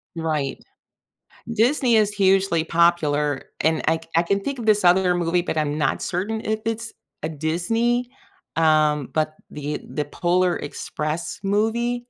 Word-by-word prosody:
Right. 155 -4 -2 0.9
Disney 240 +1 +3
is 210 -1 +3
hugely 190 -4 +2
popular 155 -4 +2 0.2
and 160 +1 +1
I 160 - +3
c 165 - -12
I 165 - +5
can 200 +3 0
think 275 +6 -4
of 235 - -5
this 210 -1 +4
other 180 0 +4
movie, 175 0 +1
but 160 - -2
I'm 150 -1 0
not 150 - 0
certain 205 +5 -2
if 220 0 -1
it's 225 +1 -3 0.3
a 155 - -1
Disney, 225 - 0 0.5
um, 155 -3 +3
but 155 0 0 0.2
the 150 0 -4
the 150 - -2
Polar 180 +3 +1
Express 155 +2 -4
movie. 225 +4 0
175 Hz, 150 wpm, -23 LUFS, 155-215 Hz, 0.9 s, I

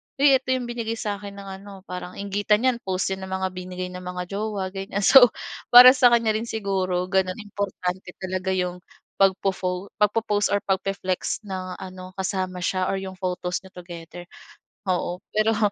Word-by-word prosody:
"Uy 280 0 +5
ito 265 - -38
'yong 255 - -2
binigay 235 -1 -3
sa'kin 205 -2 -5
ng 200 0 -9
ano." 195 -1 -12
Parang 180 -1 -7
inggitan 205 +3 0
'yan, 255 -2 +2
post 190 -3 -2
'yan 190 0 -4
ng - - -10
mga 190 0 0
binigay 185 0 -6
ng 180 0 -8
mga 180 0 -4 0.2
jowa, 200 -3 -3
ganyan. 195 +1 -4
So, 250 +3 +9 0.4
para 250 +1 +11
sa 255 -2 +5
kanya 230 -2 +3
rin 220 +2 -2
siguro 190 -5 -1
gano'n, 190 -1 +1
importante 190 -2 -4 0.2
talaga 185 0 -1
'yong 180 -1 -2 0.4
pagpo-fo 190 -1 +1 0.2
pagpo-post, 210 -1 +2
or 200 - +2
pagpi-flex 195 +1 -2
ng 185 -2 -5
ano 185 -1 -9
kasama 185 -1 -2
siya 185 +1 -1
or 195 - 0
'yong 190 -1 -6
photos 180 -1 -3
niyo 190 - -14
together. 175 -1 -10 0.6
Oo, 180 -1 -1 0.2
pero 215 +1 +2
190 Hz, 170 wpm, -24 LUFS, 185-210 Hz, 0.6 s, para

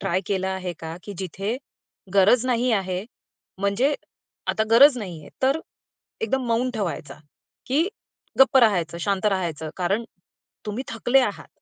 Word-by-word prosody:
Try 185 +2 0
केलं 190 -2 0
आहे 185 -2 -3
का, 160 +1 -6
की 205 - -7
जिथे 195 +5 -3 0.6
गरज 210 +5 +5
नाही 250 0 +1
आहे, 190 -1 -1 0.5
म्हणजे 200 +9 +2 0.5
आता 220 - +2
गरज 260 +4 +8
नाहीये. 175 -7 -7
तर 270 +4 +3 0.6
एकदम 265 - 0
मौन 235 +2 +1
ठेवायचं, 170 -9 -4 0.5
की 300 +8 +2 0.5
गप्प 265 0 +7
राहायचं, 180 -8 +3
शांत 200 +2 0
राहायचं? 170 -6 -1
कारण 195 +6 0 0.6
तुम्ही 225 +6 -3
थकले 245 +4 +3
आहात 210 -6 -2
205 Hz, 135 wpm, -24 LUFS, 185-250 Hz, 0.6 s, गरज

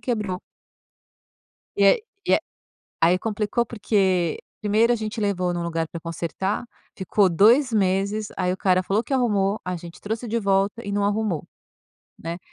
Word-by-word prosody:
quebrou. 210 -7 -2 1.4
E 200 - +3
aí 200 - +5 0.2
e - - +5
a - - +4 0.6
aí 175 +2 +4
complicou 215 +3 -1
porque, 190 -6 +1 0.2
primeiro 215 +3 +3
a - - +2
gente 220 +1 -4
levou 185 -4 0
num 175 -1 -2
lugar 165 -1 -2
pra 170 - -7
consertar, 170 +6 -3 0.3
ficou 195 +1 +2
2 230 - +5
meses, 200 +1 +1
aí 180 -1 0
o - - -3
cara 185 -1 +2
falou 200 +4 0
que - - -7
arrumou, 210 -5 +1
a 180 0 -3
gente 170 0 -11
trouxe 220 +3 -4
de 230 +2 0
volta, 200 +2 +1
e 200 - -4
não 205 0 +1
arrumou, 205 -5 0 0.7
né. 165 +1 -5
200 Hz, 165 wpm, -24 LUFS, 180-215 Hz, 1.4 s, aí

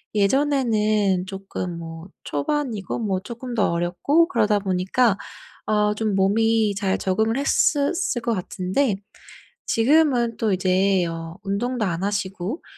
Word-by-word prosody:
예전에는 215 -5 +2
쪼끔 190 -3 -5
뭐 165 +1 -8 0.2
초반이고 220 - -2
뭐 195 -5 -1
쪼끔 235 +3 -7
더 210 -6 +2
어렸고 180 - +2
그러다 210 - +2
보니까 195 +3 +1 0.5
아 210 -1 +2
좀 215 -2 -1
몸이 215 +2 +2
잘 195 -1 0
적응을 220 +5 0
했었을 285 0 +1
것 235 0 0
같은데 190 +5 -1 0.7
지금은 245 -2 +3
또 215 -3 +1
이제 185 0 +2
어 165 +1 -6
운동도 215 +4 -1
안 175 -1 -2
하시고 195 - -3
210 Hz, 250 characters per minute, -23 LUFS, 190-235 Hz, 0.7 s, 지금은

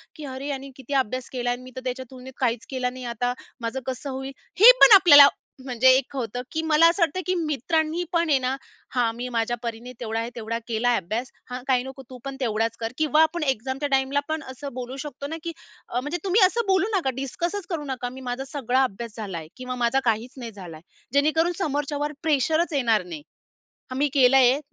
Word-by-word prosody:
की 305 - -8
अरे, 265 +1 -6
यांनी 275 -1 -5
किती 265 +1 -8
अभ्यास 255 +2 -6
केलाय. 245 -1 0
आणि 245 +1 -8
मी 255 - -11
तर 260 - -5
त्याच्या 255 +1 -3
तुलनेत 260 0 -11
काहीच 235 -3 0
केलं 255 -2 -2
नाही 255 -1 -8
आता 245 +2 0 0.3
माझं 230 +3 -3
कसं 260 +2 -4
होईल? 265 0 -5 0.3
हे 455 +5 +11
पण 425 - +11
आपल्याला 290 -7 +9 0.4
म्हणजे 255 -1 +3
एक 270 +1 -1
होतं, 245 -2 -3
की 320 - -1
मला 320 +1 +6
असं 345 +3 -2
वाटतं, 335 +2 +2
की 370 - +1
मित्रांनी 320 +1 0
पण 335 -1 +2
आहे 285 - +5
ना, 255 +1 -1 0.4
"हां, 245 -3 +2
मी 245 +1 -4
माझ्या 235 0 -1
परीने 235 +1 -5
तेवढा 225 -1 -3
आहे, 230 +1 -3
तेवढा 230 0 -3
केला 235 +1 0
आहे 240 - +3
अभ्यास. 220 +8 -4 0.2
हां, 250 0 -5
काही 255 -2 +2
नको, 265 +1 -9
तू 255 - -9
पण 275 0 -5
तेवढाच 225 -2 -1
कर." 225 0 -3
किंवा 310 0 +3
आपण 320 +1 -1
एक्झामच्या 265 +2 -1
टाईमला 270 +1 +2
पण 315 -1 -2
असं 275 +1 -8
बोलू 255 +1 -6
शकतो 280 -1 -6
ना, 320 +2 -5
की 335 - -3 0.4
अ, 245 - -1
म्हणजे 295 +7 -3
तुम्ही 395 +3 +3
असं 465 +5 0
बोलू 380 +1 +3
नका. 330 -8 0
डिस्कसचं 345 +8 -3
करू 300 - -5
नका. 245 -1 -4
मी 260 +2 -10
माझा 255 +2 -3
सगळा 260 -2 +1
अभ्यास 230 -2 -4
झाला 200 -5 -5
आहे 160 -2 -8
किंवा 255 0 -5
माझा 265 +3 +2
काहीचं 235 +3 -1
नाही 235 -1 -6
झाला 180 -6 -10
आहे. 155 - -18 0.3
जेणेकरून 310 +4 +3
समोरच्यावर 290 -1 -2
प्रेशरचं 315 +2 +1
येणार 230 -7 +2
नाही. 165 -4 -7 0.7
हां, 255 - -4
मी 290 +2 +2
केलंय, 265 -1 +5
260 Hz, 215 wpm, -24 LUFS, 245-295 Hz, 0.7 s, हे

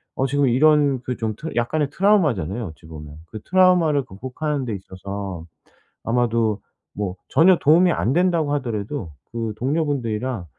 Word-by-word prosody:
어 135 - 0
지금 145 +1 +1
이런 140 0 +3
그 125 -1 -3
좀 110 -2 -3
트 160 +8 -6
약간의 135 +5 0
트라우마잖아요 140 - +1
어찌 80 +1 -13
보면. 75 -2 -10
그 110 +5 -9
트라우마를 180 -6 +3
극복하는 130 +7 -4
데 115 - -3
있어서 95 -2 -7 0.6
아마도 115 -3 0 0.3
뭐 100 -2 -4
전혀 180 +2 +5
도움이 170 +5 +5
안 130 - 0
된다고 170 -4 +1
하더라도 115 - -4 0.2
그 115 -2 -3
동료분들이랑 130 - -2
125 Hz, 340 characters per minute, -22 LUFS, 105-150 Hz, 0.6 s, 전혀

